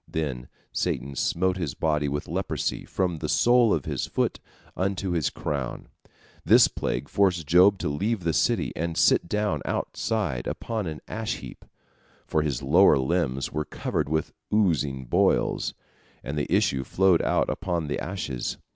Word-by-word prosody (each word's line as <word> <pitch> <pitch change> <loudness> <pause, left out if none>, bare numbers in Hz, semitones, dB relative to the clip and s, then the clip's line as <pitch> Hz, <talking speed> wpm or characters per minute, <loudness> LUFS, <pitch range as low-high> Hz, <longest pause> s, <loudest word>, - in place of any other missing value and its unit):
Then 65 -6 -3 0.2
Satan 70 +1 -2
smote 90 +7 0
his 80 -8 -3
body 75 -2 0
with 75 +1 -3
leprosy - - -2
from 90 -4 -1
the - - -4
sole 120 -2 +4
of 75 - 0
his - - -2
foot - - -1 0.4
unto 95 0 -1
his 85 -6 +1
crown. 70 -4 -4 0.5
This - - +7
plague - - -3
forced 90 -5 +1
Job 90 +6 +5
to - - -3
leave 100 +8 -1
the 85 -1 0
city, - - +1
and 85 0 -3
sit 85 - +3
down 105 -1 0
outside 100 - -2
upon 110 -5 -3
an 75 -1 -6
ash 110 0 -3
heap, - - -11 0.6
for 80 - +1
his 70 -5 -2
lower - - +6
limbs 70 -2 -1
were 75 0 -1
covered 75 - -3
with 80 0 -1 0.2
oozing 75 -11 +1
boils, - - +1 0.5
and 70 - -4
the 75 - -2
issue 65 -1 +2
flowed 95 +4 +3
out - - +1
upon 85 -3 -2
the 75 - -3
ashes. 75 -10 -4
80 Hz, 155 wpm, -26 LUFS, 70-95 Hz, 0.6 s, This